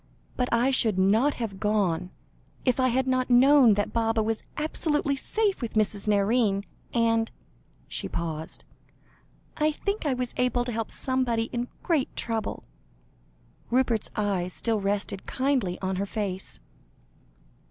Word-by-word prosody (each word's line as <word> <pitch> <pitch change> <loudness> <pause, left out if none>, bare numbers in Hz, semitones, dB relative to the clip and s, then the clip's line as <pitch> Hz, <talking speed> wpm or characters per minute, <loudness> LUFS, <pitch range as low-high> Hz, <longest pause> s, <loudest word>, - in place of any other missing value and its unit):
But 250 -1 0
I 240 +3 +3
should 225 -6 +2
not 215 +10 +3
have 210 -5 -4
gone, 195 -5 +1 0.6
if 255 -1 +2
I 255 - +4
had 255 +1 +1
not 255 -1 +1
known 250 -2 +7
that 205 - -1
Baba 225 -1 +1
was 225 0 -1 0.2
absolutely 295 -2 0
safe 410 +7 0
with 235 -2 -4
Mrs. 210 -1 +1
Nairne. 205 0 +2 0.3
And" 225 -1 +2 0.6
she - - -4
paused 160 -1 -4 0.9
"I 305 0 +3
think 400 +3 -2
I 265 - +1
was 250 -1 -3
able 250 -1 +1
to 245 - -3
help 225 -1 -3
somebody 245 -3 0
in 240 0 -1 0.2
great 310 -6 0
trouble." 225 -2 -3 1.1
Rupert's 240 -3 +2
eyes 190 -4 -1
still 225 -3 0
rested 200 -1 -2
kindly 255 -9 0
on 190 0 -1
her 200 +1 -1
face. 195 - -3
230 Hz, 140 wpm, -27 LUFS, 205-255 Hz, 1.1 s, known